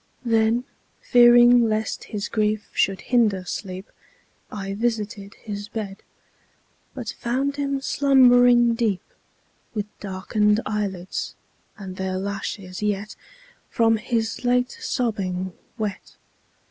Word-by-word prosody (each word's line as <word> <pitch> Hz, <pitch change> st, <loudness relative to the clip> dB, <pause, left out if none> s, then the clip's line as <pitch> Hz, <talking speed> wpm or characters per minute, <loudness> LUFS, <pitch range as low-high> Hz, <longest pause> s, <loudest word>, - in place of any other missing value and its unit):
Then, 225 Hz, +1 st, +2 dB, 0.4 s
fearing 240 Hz, -1 st, +6 dB
lest 215 Hz, 0 st, -2 dB
his 205 Hz, -2 st, -4 dB
grief 215 Hz, -1 st, -1 dB
should 195 Hz, -1 st, +1 dB
hinder 215 Hz, -7 st, +2 dB
sleep, 185 Hz, +1 st, -6 dB, 0.6 s
I 195 Hz, -2 st, -5 dB
visited 210 Hz, -2 st, -3 dB
his 205 Hz, -1 st, -7 dB
bed, 205 Hz, -3 st, -6 dB, 0.9 s
But 245 Hz, -4 st, -5 dB
found 270 Hz, +5 st, -2 dB
him 275 Hz, -1 st, -1 dB
slumbering 245 Hz, -4 st, +5 dB
deep, 225 Hz, -5 st, 0 dB, 0.7 s
With 210 Hz, -1 st, -1 dB
darken'd 210 Hz, +2 st, +1 dB
eyelids, 195 Hz, -4 st, -3 dB, 0.4 s
and 190 Hz, -2 st, -8 dB
their 190 Hz, 0 st, -2 dB
lashes 195 Hz, -1 st, -5 dB
yet 210 Hz, 0 st, -1 dB
10 -, -, -10 dB, 0.5 s
From 225 Hz, -1 st, +3 dB
his 225 Hz, 0 st, -2 dB
late 250 Hz, 0 st, +2 dB
sobbing 190 Hz, -6 st, -2 dB, 0.2 s
wet. 210 Hz, -4 st, -5 dB
215 Hz, 110 wpm, -23 LUFS, 195-240 Hz, 0.9 s, fearing